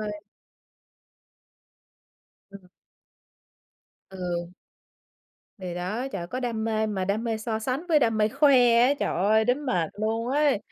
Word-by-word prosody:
ơi. 210 -1 -5 2.3
Ừm. 195 -2 -13 1.4
Ừ. 175 -1 -5 1.0
Thì 180 -2 -6
đó, 210 +9 -3
trời 195 - -4
ơi, 170 - -5
có 255 +7 -5
đam 230 -3 -2
mê 220 -1 0
mà 195 -3 -2
đam 210 +4 -1
mê 225 -1 -1
so 220 0 -3
sánh 260 +9 -3
với 310 -2 +5
đam 225 -5 +1
mê 210 0 +3
khoe 245 -3 +4
á, 265 +4 +4
trời - - -1
ơi, 215 +4 +3
đến 265 +4 0
mệt 175 -10 0
luôn 225 +2 -1
ấy. 285 -3 +2
220 Hz, 145 wpm, -26 LUFS, 195-250 Hz, 2.3 s, với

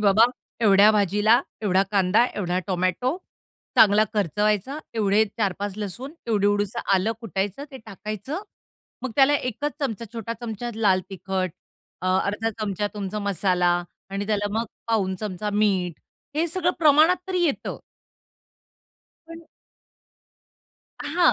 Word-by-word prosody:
बाबा 210 +2 +6 0.4
एवढ्या 205 -1 +6
भाजीला 210 +3 +3 0.2
एवढा 190 -2 +3
कांदा, 200 +3 +4
एवढा 180 -3 -1
टोमॅटो, 185 - 0 0.6
चांगला 210 0 +6
खर्च 200 -7 +1
व्हायचा. 210 +7 +1 0.2
एवढे 210 -1 +3
4-5 200 -1 -1
लसूण 215 - -5
एवढी. 210 -3 +2
एवढंसं 205 +2 0
आलं 195 +4 +1
कुटायचं 205 +3 -3
ते 265 - -9
टाकायचं. 215 - -5 0.6
मग 260 - -3
त्याला 280 +1 +6
1 250 0 -4 0.2
च 230 -5 -2
छोटा 230 -1 -4
चमचा 240 0 -4
लाल 200 -4 +3
तिखट 185 0 -2 0.5
अ, - - -2 0.2
अर्धा 210 +3 -1
चमचा 205 -1 -1
तुमचा 205 0 -4
मसाला 185 -3 +1 0.4
आणि 200 +1 -3
त्याला 205 -1 0
मग 230 - 0 0.2
पाव 225 -4 +1
चमचा 210 -1 -3
मीठ 195 -5 +1 0.4
हे 325 +2 +2
सगळं 355 +1 +1
प्रमाणात 315 +3 +6
तरी 370 -1 0
येतं. 295 -5 -2 1.5
पण 330 0 -10 1.6
अ, - - -4
हां, 340 +4 +4
210 Hz, 130 wpm, -24 LUFS, 195-235 Hz, 1.6 s, बाबा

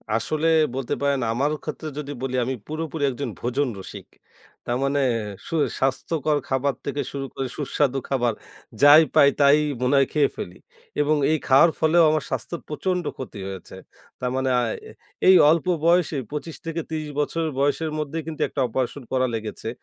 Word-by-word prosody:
আসলে 150 +8 0 0.3
বলতে 135 -2 -2
পারেন 140 -1 +1
আমারও 140 +6 0
ক্ষেত্রে 155 0 -5
যদি 145 -1 -5
বলি 130 -1 -2
আমি 130 +2 -2
পুরোপুরি 155 0 -4
একজন 130 +1 -4
ভোজন 130 +4 0
রসিক। 95 - -9 0.6
তার 120 - -1
মানে 140 +1 +1 0.5
সু - - -3 0.2
স্বাস্থ্যকর 150 +3 0
খাবার 135 +1 +1
থেকে 140 0 -2
শুরু 140 -1 -4
করে 135 - -3
সুস্বাদু 140 -2 0
খাবার, 120 -4 +1 0.5
যাই 145 +2 +9
পাই 140 - +7
তাই 140 +1 +6 0.2
মনে 130 +2 +2
হয় 135 -1 +4
খেয়ে 145 -2 +3
ফেলি। 90 - -6 0.4
এবং 150 +1 +2 0.2
এই 160 - +3
খাওয়ার 140 +5 +6
ফলেও 165 +2 +4
আমার 155 -2 0
স্বাস্থ্য - - -3
প্রচন্ড 180 +4 -2
ক্ষতি 125 -5 -7
হয়েছে। 95 -2 -8 0.4
তার 125 0 -2
মানে 130 0 0
আ - - +2 0.3
এ - - -11 0.4
এই 190 - +9
অল্প 165 +2 +2 0.2
বয়সে 170 -3 +3
২৫ 150 +2 -5
থেকে 165 0 -3
৩০ 155 -1 -3
বছরের 160 +2 -1
বয়সের 145 +3 +1
মধ্যেই 155 +2 -3
কিন্তু 160 -2 -6
একটা 140 - -3
অপারেশন 130 +3 -3
করা 130 0 +2
লেগেছে, 110 0 -6
145 Hz, 170 wpm, -23 LUFS, 130-155 Hz, 0.6 s, যাই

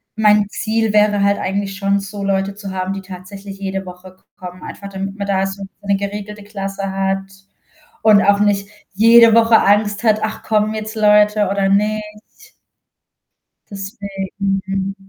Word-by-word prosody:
mein 210 -1 +4
Ziel 220 0 -1
wäre 210 -1 +3
halt 200 0 +2
eigentlich 195 0 -3
schon 200 0 +1
so 200 0 -7
Leute 195 0 -1
zu 200 -2 -7
haben, 185 0 -3
die 195 - -6
tatsächlich 195 +1 -10
jede 195 -1 -4
Woche 180 +1 -12
k 185 - -34
kommen, 180 -1 -10
einfach 200 - -8
damit 195 0 -5
man 200 - -4
da 195 -1 +1
so 195 +1 -7 0.2
'ne 200 -1 +1
geregelte 205 +1 -6
Klasse 195 -1 -5
hat 195 0 -1 0.8
und 210 -2 +6
auch 200 0 +4
nicht 200 -1 +1 0.3
jede 230 +2 +7
Woche 230 0 +6
Angst 205 +1 +2
hat: 215 -2 +3
„Ach 220 0 -4
kommen 215 0 +1
jetzt 215 +1 -5
Leute 210 -1 +4
oder 195 0 0
nicht?“ 210 +1 -3 1.2
Deswegen, 195 -1 -4
hm,. 195 0 -3
200 Hz, 160 wpm, -18 LUFS, 195-210 Hz, 1.2 s, jede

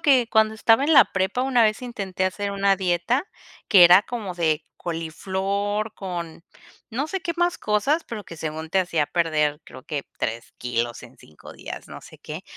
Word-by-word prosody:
que 260 -5 +4
cuando 220 0 +3
estaba 225 +4 +3
en 320 - +2
la - - +8
prepa 195 +6 -1
una 255 -3 +3
vez 215 +3 +1
intenté 195 -6 -3
hacer 200 +2 -2
una 200 0 +2
dieta 185 - 0 0.4
que 190 -4 +7
era 180 +3 +8
como 215 -5 -5
de 160 -3 0
coliflor 195 +6 -3
con 170 -4 -6 0.4
no 265 +6 -3
sé 385 +1 -3
qué 340 +1 -2
más 350 0 +1
cosas 220 +10 +1
pero 215 -3 -7
que 170 - -11
según 160 0 -5
te 195 - +2
hacía 170 -5 +1
perder 155 -3 0
creo - - -12
que 150 -2 -4
3 115 +1 -4
kilos 120 -1 -2
en - - -14
5 75 - -14
días, - - -9
no - - -9
sé - - -15
qué, - - -8
195 Hz, 185 wpm, -24 LUFS, 165-225 Hz, 0.4 s, la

